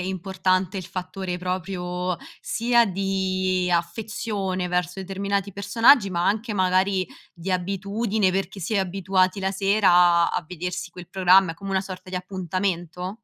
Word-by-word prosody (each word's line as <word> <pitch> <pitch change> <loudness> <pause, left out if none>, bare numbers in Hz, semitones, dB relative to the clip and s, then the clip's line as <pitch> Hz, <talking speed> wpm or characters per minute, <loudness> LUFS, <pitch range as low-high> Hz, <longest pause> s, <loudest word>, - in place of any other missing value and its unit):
e 180 - -3
importante 185 0 -1
il 185 - -6
fattore 185 0 -5
proprio 180 0 -3 0.2
sia 235 0 +2
di 185 -1 0
affezione 190 +1 -2
verso 180 +1 -1
determinati 195 +1 -2
personaggi, 225 +3 +4
ma 175 -1 -1
anche, 215 +1 0
magari, 185 0 +2 0.3
di 175 +2 -5
abitudine 200 +3 0
perché 195 +1 -3
si 175 - -4
è - - +3
abituati 190 +1 +1
la 190 - 0
sera 200 0 +3
a 175 0 +6
a - - +3
a 175 - -2
vedersi 180 0 -5
quel 180 -1 -11
programma, 185 -2 +4
è - - -14
come 195 +1 -7
una 190 0 +2
sorta 185 -1 -9
di 185 - -3
appuntamento? 180 0 -3
185 Hz, 155 wpm, -24 LUFS, 180-195 Hz, 0.3 s, a